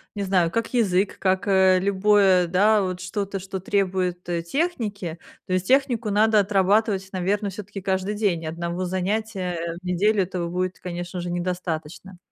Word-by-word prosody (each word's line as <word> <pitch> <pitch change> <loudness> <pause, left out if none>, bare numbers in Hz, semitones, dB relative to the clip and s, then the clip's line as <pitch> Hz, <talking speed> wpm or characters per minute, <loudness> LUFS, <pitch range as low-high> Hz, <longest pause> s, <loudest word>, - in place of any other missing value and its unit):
не 200 - -2
знаю, 185 -3 +2
как 230 +6 -2
язык, 200 -5 +1
как, 190 0 +1
э, 190 -1 +5
любое, 195 -2 +4
да, 205 +4 +4
вот 185 -1 -3
что-то, 195 +1 -3
что 190 +1 -6
требует, 185 -2 -1
э, 170 -1 -1
техники. 205 - -2 0.3
То 185 - -3
есть 185 0 0
технику 250 -4 +2
надо 215 +1 +4
отрабатывать, 200 0 +2
наверно, 200 +3 -1
все-таки 200 0 -8
каждый 190 +1 -1
день. 195 -6 0
И - - -6
одного 170 +3 -3
занятия 185 -3 -2
в - - -38
неделю 195 +3 +2
этого 180 -1 -3
будет, 180 +1 -3
конечно 175 0 -5
же, 175 - -4
недостаточно. 175 0 -4
190 Hz, 160 wpm, -24 LUFS, 180-205 Hz, 0.3 s, э